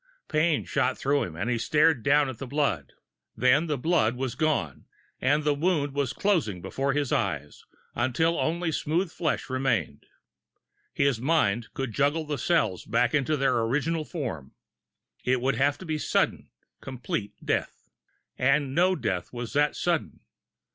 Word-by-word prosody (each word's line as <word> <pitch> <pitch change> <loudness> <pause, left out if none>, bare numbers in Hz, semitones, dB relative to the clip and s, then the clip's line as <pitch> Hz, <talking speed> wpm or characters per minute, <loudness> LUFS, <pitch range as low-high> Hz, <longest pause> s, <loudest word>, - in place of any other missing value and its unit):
Pain 155 0 +1
shot 130 +1 0
through 140 +1 +1
him, 80 - -4
and 95 +7 -3
he 120 -1 0
stared 150 +1 +3
down 145 +4 +3
at 130 -4 -7
the 135 - -6
blood. 125 - -1 0.4
Then 135 +6 +3
the 150 -2 -1
blood 125 -6 +2
was 130 -1 -3
gone, 140 - -1 0.3
and 145 +4 +2
the 150 0 +2
wound 145 -2 0
was 140 -2 0
closing 155 - 0
before 135 +10 -2
his 145 -2 -1
eyes, 80 -10 -2 0.3
until 140 +8 +1
only 170 +1 0
smooth 165 +4 -1
flesh 160 -4 -2
remained. 130 - -1 0.8
His 140 -5 +1
mind 120 -7 +1
could 135 -4 -3
juggle 145 +4 +1
the 150 -2 -3
cells 110 - +1
back 115 +2 +1
into 150 +1 +1
their 135 -3 +2
original 150 +8 0
form. 120 - -5 0.7
It 130 0 +2
would 135 +3 +1
have 140 +1 +2
to 185 - -10
be 155 -2 -2
sudden, - - 0 0.3
complete 120 -5 -4
death. - - -2 0.5
And 140 0 +2
no 180 +4 +3
death 90 - -3
was 120 -1 -6
that 145 +1 +2
sudden! 170 -3 -1
140 Hz, 155 wpm, -27 LUFS, 120-155 Hz, 0.8 s, stared